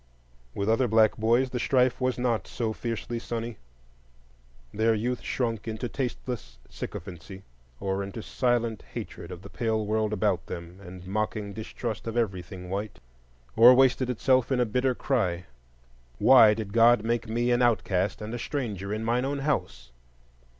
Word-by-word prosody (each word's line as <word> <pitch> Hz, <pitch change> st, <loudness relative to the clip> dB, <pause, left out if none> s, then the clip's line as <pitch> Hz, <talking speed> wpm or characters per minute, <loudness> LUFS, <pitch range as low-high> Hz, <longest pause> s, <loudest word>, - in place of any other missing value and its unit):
With 100 Hz, -, -2 dB
other 115 Hz, +3 st, +3 dB
black 110 Hz, -1 st, +4 dB
boys 120 Hz, +4 st, +2 dB
the 125 Hz, -, -2 dB
strife 130 Hz, 0 st, +2 dB
was 130 Hz, 0 st, 0 dB
not 120 Hz, -3 st, 0 dB
so 115 Hz, -3 st, -2 dB
fiercely 115 Hz, +1 st, -4 dB
sunny: 115 Hz, -1 st, -5 dB, 1.2 s
their 110 Hz, +1 st, +2 dB
youth 120 Hz, +3 st, -2 dB
shrunk 115 Hz, -3 st, -2 dB
into 110 Hz, +2 st, -3 dB
tasteless 125 Hz, -1 st, -5 dB
sycophancy, 95 Hz, +3 st, -8 dB, 0.4 s
or 95 Hz, 0 st, -1 dB
into 100 Hz, +3 st, -6 dB
silent 120 Hz, -3 st, 0 dB
hatred 85 Hz, -, -7 dB
of 90 Hz, +1 st, -9 dB
the 100 Hz, -, -10 dB
pale 110 Hz, -2 st, -1 dB
world 110 Hz, 0 st, 0 dB
about 100 Hz, -4 st, 0 dB
them 85 Hz, +2 st, -8 dB
and 90 Hz, -1 st, -10 dB
mocking 105 Hz, +1 st, -2 dB
distrust 110 Hz, +2 st, -5 dB
of 115 Hz, +1 st, -3 dB
everything 95 Hz, -4 st, -3 dB
white; 100 Hz, +3 st, -4 dB, 0.6 s
or 120 Hz, +3 st, +9 dB
wasted 130 Hz, -1 st, +3 dB
itself 130 Hz, +1 st, +2 dB
in 130 Hz, -, +2 dB
a 125 Hz, -, +3 dB
bitter 125 Hz, +3 st, 0 dB
cry, 90 Hz, -12 st, -1 dB, 0.7 s
Why 115 Hz, -4 st, +7 dB
did 105 Hz, -3 st, -6 dB
God 115 Hz, -1 st, +5 dB
make 115 Hz, 0 st, -1 dB
me 120 Hz, +2 st, +1 dB
an 120 Hz, +1 st, +3 dB
outcast 105 Hz, -4 st, +1 dB
and 110 Hz, +2 st, -6 dB
a 120 Hz, -, -4 dB
stranger 105 Hz, -, -4 dB
in 110 Hz, +1 st, -2 dB
mine 120 Hz, +2 st, +1 dB
own 140 Hz, +2 st, -1 dB
house? 135 Hz, -, -2 dB
115 Hz, 155 wpm, -27 LUFS, 100-120 Hz, 1.2 s, or